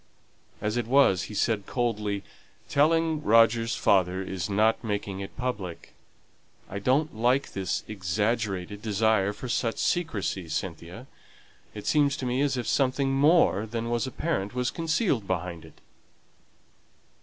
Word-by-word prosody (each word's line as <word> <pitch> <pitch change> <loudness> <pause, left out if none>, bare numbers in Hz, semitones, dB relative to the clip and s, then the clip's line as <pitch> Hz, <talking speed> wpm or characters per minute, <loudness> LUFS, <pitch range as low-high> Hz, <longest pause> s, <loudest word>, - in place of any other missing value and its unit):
As 105 +3 -1
it 120 -2 -1
was, 120 -9 +4
he 105 - -7
said, 105 -2 0
coldly, 105 -5 -1 0.4
"Telling 160 +1 +2
Roger's 115 -1 +4
father 95 -1 +2
is 95 -1 -4
not 110 +4 +2
making 100 -3 -3
it 95 - -8
public. 105 -9 -5 0.7
I 100 - -5
don't 130 +6 +1
like 125 +5 +1
this 95 -2 -2
exaggerated 105 0 -2
desire 110 -2 +2
for 125 - -8
such 115 -1 -1
secrecy, 105 - -1
Cynthia. 85 +7 -5 0.7
It 105 - -7
seems 145 -1 +2
to 130 - -4
me 125 +2 0
as 140 -2 +1
if 120 - -3
something 135 0 +1
more 140 - +4
than 115 +1 -3
is 120 +2 0
apparent 125 -7 -2
was 125 -1 0
concealed 165 - 0
behind 90 -2 -3
it." - - -17
110 Hz, 135 wpm, -27 LUFS, 100-130 Hz, 0.7 s, was